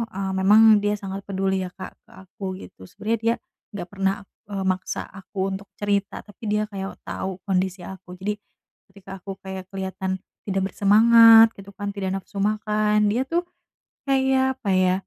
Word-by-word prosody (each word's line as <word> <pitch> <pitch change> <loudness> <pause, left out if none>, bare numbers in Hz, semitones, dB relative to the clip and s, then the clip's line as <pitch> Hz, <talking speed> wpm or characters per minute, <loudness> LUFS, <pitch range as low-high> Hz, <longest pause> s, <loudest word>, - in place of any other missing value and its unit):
eee, 195 0 -2
memang 215 +2 +7
dia 205 0 0
sangat 195 -1 -6
peduli 190 -1 0
ya - - -9
Kak 185 - -8 0.2
ke - - -21
aku 195 +3 -14 0.2
gitu, 95 - -13
sebenernya 225 - -2
dia 230 +1 +3 0.4
nggak 180 -3 -5
pernah, 195 -1 +1 0.3
eee, 200 -2 -3
maksa 185 0 -4 0.2
aku 195 +1 -17
untuk 195 +1 -6
cerita, 200 -1 -1
tapi 205 +2 -18
dia 210 +1 +1
kayak 195 -1 -5
tau 190 -1 -5
kondisi 190 -1 -1
aku, 180 0 -10
jadi 205 +3 -3 0.5
ketika 195 0 -11
aku 195 +2 -7
kayak 190 -1 -7
kelihatan 190 -1 -3 0.3
tidak 195 -1 0
bersemangat 225 +2 +7
gitu 195 0 -12
kan, 205 -1 -4
tidak 200 -2 -3
nafsu 195 +1 -7
makan, 210 0 +2
dia 235 +4 +1
tuh 340 +3 0 0.6
kayak 265 -1 +2
apa 210 - -2
ya, 185 -1 +3
200 Hz, 165 wpm, -24 LUFS, 190-210 Hz, 0.6 s, memang